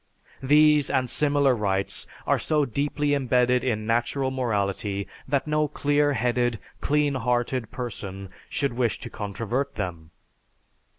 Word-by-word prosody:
These 150 +1 +5
and 130 -1 +1
similar 145 -1 +2
rights 100 -2 -1 0.2
are - - +2
so 150 -2 +1
deeply 145 +3 0
imbedded 125 -2 +2
in 110 -4 -1
natural 120 +4 0
morality 100 -5 -1 0.2
that 140 0 0
no 150 0 +1
clear 145 0 +1
headed, 120 -1 +1 0.2
clean 150 -1 +1
hearted 125 -1 -1
person 100 -6 -6 0.3
would 140 - +1
wish 120 -2 0
to - - -7
controvert 115 +7 -3
them.... 85 -6 -5
125 Hz, 125 wpm, -25 LUFS, 110-140 Hz, 0.3 s, These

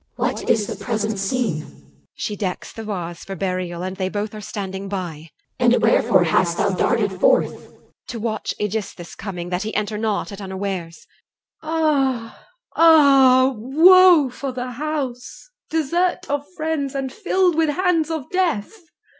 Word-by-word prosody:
CH. - - -45
What - - -2
is 220 -3 +3
the - - -7
present 215 -3 -2
scene? 200 -5 -1
EL. - - -14 0.4
She 210 - -4
decks 190 -3 -4
the 225 - -7
vase 175 -5 -5
For 195 - -7
burial, 180 -1 -3
and 185 0 -5
they 185 -1 -1
both 205 +2 -4
are 215 - -7
standing 195 -2 -6
by. 170 -5 -5
CH. - - -42 0.3
And 245 -1 +4
wherefore - - +3
hast - - +1
thou - - +1
darted - - +1
forth? - - +3
EL. - - -16 0.3
To 235 - -6
watch 220 -1 -3
Aegisthus' 210 -4 -4
coming, 175 -4 -6
that 180 0 -2
he 215 +1 -4
enter 210 0 -2
not 215 -1 -2
At 200 0 -8
unawares. 190 0 -5 0.6
CLY. 315 - -9
(within). 325 0 0 0.6
Ah! - - -27 0.3
ah! 275 -5 +6
Woe 320 +5 +6
for 270 +2 -5
the 250 0 -5
house, 275 - -5 0.2
Desert 335 +3 0
of 285 0 -2
friends, 310 -3 -2
and 270 -1 -3
filled 375 -4 +1
with 320 -1 +1
hands 330 0 +1
of 315 -5 -4
death! 360 - 0
230 Hz, 170 wpm, -21 LUFS, 195-305 Hz, 0.6 s, ah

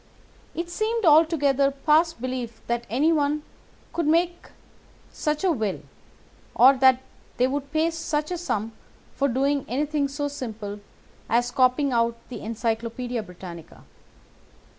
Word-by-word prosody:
It 340 +1 -3
seemed 445 +2 -1
altogether 295 -4 +4
past 305 +3 +2
belief 250 -2 -4
that 235 0 -2
anyone 295 +3 +2 0.5
could 330 -2 -1
make 345 +2 +1 0.6
such 300 +2 -2
a 375 - +3
will, 220 - -1 0.8
or 260 +3 +8
that 260 0 +5 0.3
they 250 - +4
would 280 +1 -3
pay 320 +2 +1
such 310 -1 -2
a 355 - -1
sum 225 - -2 0.4
for 280 - +1
doing 275 +2 +1
anything 290 +3 0
so 290 +1 -3
simple 220 -7 -6 0.5
as 240 +1 +2
copying 255 +2 +3
out 230 0 +2
the 250 - -6
Encyclopædia 230 +2 -3
Britannica. 175 -3 -11
275 Hz, 125 wpm, -25 LUFS, 235-305 Hz, 0.8 s, or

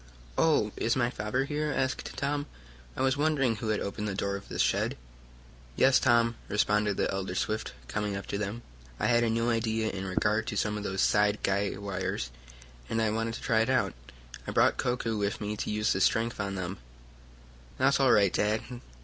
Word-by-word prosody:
"Oh, 145 -10 +3
is 115 - +1
my 120 -2 +1
father 115 +5 -1
here?" 150 +1 -1
asked 130 -2 -2
Tom. 145 +2 -1 0.5
"I - - 0
was 135 +1 +2
wondering 140 -6 +2
who 110 - -4
had 110 -1 +1
opened 105 +1 -3
the 100 - -2
door 100 0 -1
of 100 - -9
this - - +1
shed." - - 0 0.8
"Yes, 130 0 +5
Tom," 115 -2 +3
responded 105 0 +2
the - - 0
elder 95 -1 -3
Swift, 110 -2 -2
coming 105 -1 -2
up 100 - -6
to 100 - -2
them, 105 +3 -4 0.4
"I - - 0
had 120 -1 +4
a 115 - +2
new 115 +1 +1
idea 110 -1 0
in 95 -1 -5
regard 105 +4 +1
to 110 -5 -3
some 105 0 0
of 105 - -4
those 95 -2 -1
side 105 0 +3
guy 100 +1 +1
wires, 95 -10 -3 0.6
and 115 - 0
I 110 -1 +2
wanted 115 +1 -1
to - - -8
try 110 -3 +2
it 115 - +2
out. 130 -1 +2 0.5
I - - -3
brought - - +3
Koku 120 -3 -1
with 100 0 -1
me 105 0 -3
to - - -3
use 105 0 +1
his 95 - +1
strength 115 0 +1
on 100 -1 -2
some - - -4
of 95 - -2
them." 95 - -6 1.0
"That's 135 +2 +3
all 135 -2 +5
right, 100 -3 +4
Dad. 105 +1 +1
110 Hz, 210 wpm, -29 LUFS, 100-120 Hz, 1.0 s, Yes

